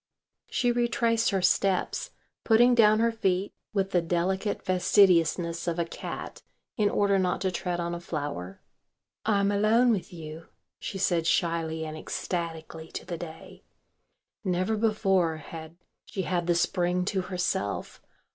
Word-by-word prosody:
She 245 -2 +1
retraced 235 -1 +2
her 195 -3 0
steps, 195 - +1 0.3
putting 240 +2 +5
down 215 -2 +5
her 230 0 +3
feet 195 -3 0 0.2
with 195 -2 0
the 180 - +3
delicate 185 +4 -1
fastidiousness 175 -3 +3
of 170 0 0
a 170 - +1
cat - - -7 0.3
in 210 -1 +2
order 200 -1 +2
not 180 -1 0
to 190 - 0
tread 175 -1 -2
on 170 0 -2
a 175 - -4
flower. 145 - -5 0.7
"I'm 200 -2 +3
alone 220 +4 +4
with 200 -5 -2
you," 160 -1 -9 0.3
she 195 - -5
said 175 -3 +1
shyly 165 -2 0
and 155 0 -6
ecstatically 160 0 -4
to - - -5
the 170 -2 -5
day. 160 -2 -10 0.8
Never 185 +3 0
before 195 -6 +2
had 160 +1 -9 0.3
she 190 - -3
had 175 -2 -1
the 175 - +3
Spring 180 +1 +1
to 190 -1 0
herself. 180 - -2
180 Hz, 145 wpm, -28 LUFS, 170-205 Hz, 0.8 s, putting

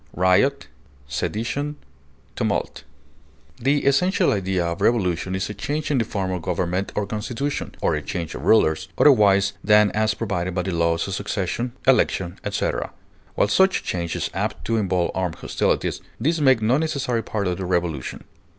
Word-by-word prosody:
insubordination, 100 - -1 1.8
The 140 +4 +1
essential 180 +8 +3
idea 95 -3 0
of 85 0 -3
revolution 95 -5 +1
is 95 0 -2
a 105 - -5
change 150 +9 -3
in 135 - +2
the - - +2
form 95 -4 -3
of 90 -2 -3
government 90 +2 -1
or 105 - 0
constitution, 115 +7 -3
or - - +2
a - - -1
change 85 -3 -4
of - - -6
rulers, 80 -8 +3
otherwise 100 -7 +5
than 105 0 +5
as 110 +1 +1
provided 90 -5 -2
by 90 - 0
the 95 - -2
laws 85 0 +1
of 95 - -4
succession, 105 +4 -2
election, 95 -9 +2
etc.; - - -2 0.5
while - - +3
such 190 - +3
change 85 -2 -3
is - - -2
apt - - -3
to 115 - 0
involve 95 -4 0
armed 90 -3 -2
hostilities, - - -1 0.2
these 155 +7 +1
make 130 -6 +4
no 125 +6 +3
necessary 140 -7 -1
part 105 -2 -3
of 90 -1 -1
the 95 - -3
revolution. 85 -6 -2
100 Hz, 160 wpm, -23 LUFS, 90-125 Hz, 1.8 s, otherwise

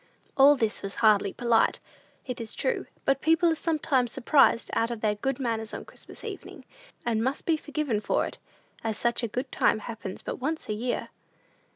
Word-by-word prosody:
All 280 +2 +7
this 225 -5 -1
was 195 0 -5
hardly 205 -2 +5
polite, 235 -2 +2 0.5
it 250 -2 -5
is 225 - -7
true; - - -1 0.2
but 275 0 +2
people 325 +1 +4
are - - +3
sometimes 300 -6 0
surprised 245 -2 +3
out 230 - +1
of 235 -2 -5
their 215 -1 +2
good 255 +6 -2
manners 225 -4 -2
on - - -7
Christmas - - -10
evenings, - - -8 0.4
and 225 -2 +1
must 265 +3 -2
be 330 - +3
forgiven 295 -7 -2
for - - +1
it, - - -8 0.4
as 220 -2 -2
such 235 0 +1
a 235 - -1
good 250 +4 -4
time - - +3
happens 215 -3 -7
but - - -4
once 310 +5 -3
a 215 - -1
year. 240 +4 -2
240 Hz, 190 wpm, -27 LUFS, 220-280 Hz, 0.5 s, All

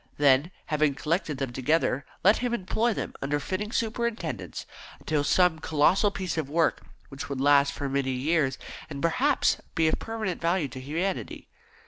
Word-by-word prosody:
Then, 140 +2 +4 0.2
having 150 -2 +1
collected 155 -1 -1
them 135 -3 -3
together, 135 0 +1 0.2
let 205 +5 +6
him 245 -1 0
employ 225 +3 0
them, - - -4
under 145 +2 0
fitting 190 +8 -3
superintendence, 230 0 -3 0.3
upon 150 -2 0
some 175 +1 +3
colossal 160 +7 +3
piece 185 -4 -3
of 145 -3 -3
work 160 0 +1 0.3
which 135 0 -7
would 140 -2 -3
last 140 0 +5
for 140 - -4
many 135 -1 0
years, 135 +1 +1 0.3
and 145 -3 -6
perhaps 255 - +2 0.2
be 165 -2 +3
of 155 - +1
permanent 220 -5 -4
value 170 -3 +1
to 130 - -8
humanity. 165 +8 -3
155 Hz, 160 wpm, -27 LUFS, 140-190 Hz, 0.3 s, let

